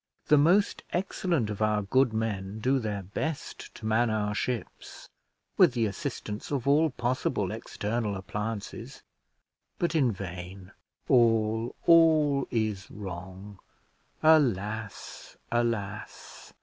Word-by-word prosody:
The 150 - +7
most 180 +8 +3
excellent 175 - -1
of 105 - -6
our 105 -1 +2
good 130 +5 +3
men 105 -3 -3
do 130 +4 +2
their 105 -4 -3
best 140 - -5
to - - -10
man 110 +2 +2
our 105 -1 -1
ships, 120 +2 -5 0.5
with 175 -9 +6
the 115 -3 +1
assistance 105 +1 -5
of 140 -3 -2
all 155 +3 +4
possible 125 -1 -1
external 105 -1 -3
appliances; 105 +2 -6 0.7
but 170 -2 0
in 140 -7 +3
vain. 95 -1 -8 0.4
All, 115 -1 +3
all 155 -5 +5
is 110 -4 -2
wrong 95 0 -8 0.6
alas! 110 -9 +1
alas! 115 -4 -3
110 Hz, 110 wpm, -28 LUFS, 105-135 Hz, 0.7 s, The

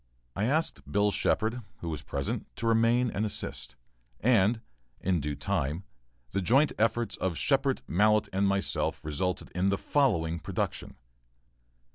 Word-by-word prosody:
I 105 - 0
asked 155 +7 -1
Bill 105 0 +3
Shepard, 115 +4 0 0.2
who 85 - -3
was 75 -3 -4
present, 70 -1 -3
to - - -4
remain 115 +2 +3
and 100 - -1
assist, 65 - -5 0.4
and, 115 -1 +3 0.4
in 90 -2 +1
due 75 0 -3
time, 75 +6 -1 0.5
the 100 - 0
joint 135 +10 +4
efforts 115 +1 +1
of 90 -3 -1
Shepard, 135 -1 +1
Mallett, 105 +5 +3
and 100 +1 +2
myself 100 0 0
resulted 80 +4 -2
in 90 +2 +1
the 100 - +1
following 85 - +1
production. - - -3
100 Hz, 140 wpm, -29 LUFS, 85-115 Hz, 0.5 s, joint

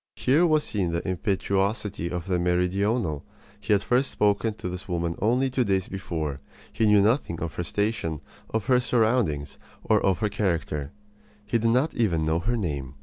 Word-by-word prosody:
Here 155 +7 +3
was 155 -2 +3
seen 90 -5 -2
the 85 +3 -2
impetuosity 100 0 -1
of 90 -1 -4
the 90 -2 0
meridional. 90 - 0 0.4
He 105 - -4
had 100 -1 +4
first 125 +5 +2
spoken 105 +1 +1
to 100 - -6
this 90 +1 -6
woman 85 -2 -1
only 125 +5 +2
two 130 0 +1
days 95 -3 0
before. 80 -7 -4 0.3
He 110 -1 +2
knew 105 -1 +5
nothing 105 - +1
of 80 -3 -4
her 90 - -3
station, 100 -5 -2 0.3
of 110 -2 -2
her 125 +1 +4
surroundings, 110 - 0 0.3
of 95 -2 +3
her 105 - 0
character. 80 -8 -2 0.5
He 115 +3 +1
did 115 +1 +2
not 130 +7 +2
even 85 -9 +1
know 80 +1 +1
her 115 +7 -1
name. 70 - -4
100 Hz, 175 wpm, -26 LUFS, 85-115 Hz, 0.5 s, knew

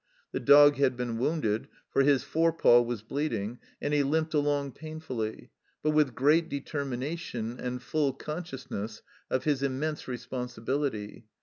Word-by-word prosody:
The - - -2
dog 145 0 +7
had 130 -3 +2
been 120 -2 -2
wounded, 125 -6 0 0.2
for - - +3
his 140 -1 +4
fore 165 +1 +2
paw 120 -7 +6
was 120 -3 -3
bleeding, 120 -4 -2 0.2
and 145 - -2
he 145 - +4
limped 155 +3 0
along 145 -2 +1
painfully, 155 -8 -6 0.3
but 155 - +3
with 150 -5 +2
great 155 +5 +3
determination 135 -3 -4
and 125 0 -3
full 150 -3 +1
consciousness 135 - -6 0.3
of 130 - 0
his 145 -3 +1
immense 140 +3 -2
responsibility. 125 -2 -3
140 Hz, 140 wpm, -29 LUFS, 120-150 Hz, 0.3 s, dog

